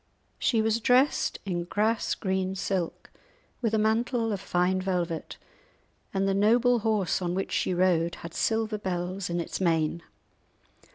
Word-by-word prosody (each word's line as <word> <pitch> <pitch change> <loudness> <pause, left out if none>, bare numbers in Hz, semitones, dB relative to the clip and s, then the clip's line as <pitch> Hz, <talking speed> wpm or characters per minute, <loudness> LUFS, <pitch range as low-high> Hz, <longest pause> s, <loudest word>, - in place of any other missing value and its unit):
She 225 -4 +2
was 220 +1 +1
dressed 255 +4 +3
in 175 -3 -2
grass 215 +4 0
green 190 -1 -1
silk, 185 -2 -3 0.5
with 225 -2 +1
a - - +3
mantle 225 +2 +1
of 195 - -4
fine 180 +1 +1
velvet, 175 -3 -2 0.7
and 195 0 0
the 195 - +2
noble 235 +5 +4
horse 210 -5 0
on 175 0 -1
which 195 - -2
she - - 0
rode 175 -2 +2
had 170 0 -9
silver 220 -1 0
bells 185 0 -3
in 175 0 -1
its 170 - -4
mane. 165 -2 +1
195 Hz, 150 wpm, -27 LUFS, 175-220 Hz, 0.7 s, noble